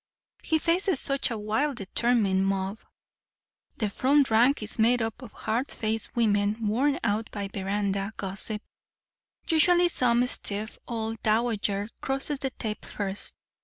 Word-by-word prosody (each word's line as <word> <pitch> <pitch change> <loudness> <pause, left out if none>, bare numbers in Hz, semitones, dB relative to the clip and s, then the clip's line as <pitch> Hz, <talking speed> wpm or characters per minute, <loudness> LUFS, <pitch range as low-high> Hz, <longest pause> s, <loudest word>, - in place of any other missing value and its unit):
He 320 - +1
faces 345 0 +1
such 275 0 +1
a 230 - -3
wild 220 +8 0
determined 195 -2 +1
mob. 195 +2 -1 1.0
The 215 - 0
front 275 +3 +3
rank 240 +3 +4
is 215 - -2
made 240 +3 +4
up 225 +1 -3
of 245 -5 -10
hard 230 +5 -2
faced 220 0 -3
women 205 -2 +2
worn 270 +7 +1
out 220 0 0
by 200 -2 -4
veranda 200 +1 -2
gossip. 200 +2 -4 0.8
Usually 350 +2 +4
some 245 -5 +3
stiff 215 -3 -3
old 225 -1 -3
dowager 215 -2 +1
crosses 270 +1 +1
the 270 - -1
tape 220 -4 -5
first. 200 -1 -5
225 Hz, 135 wpm, -27 LUFS, 205-260 Hz, 1.0 s, rank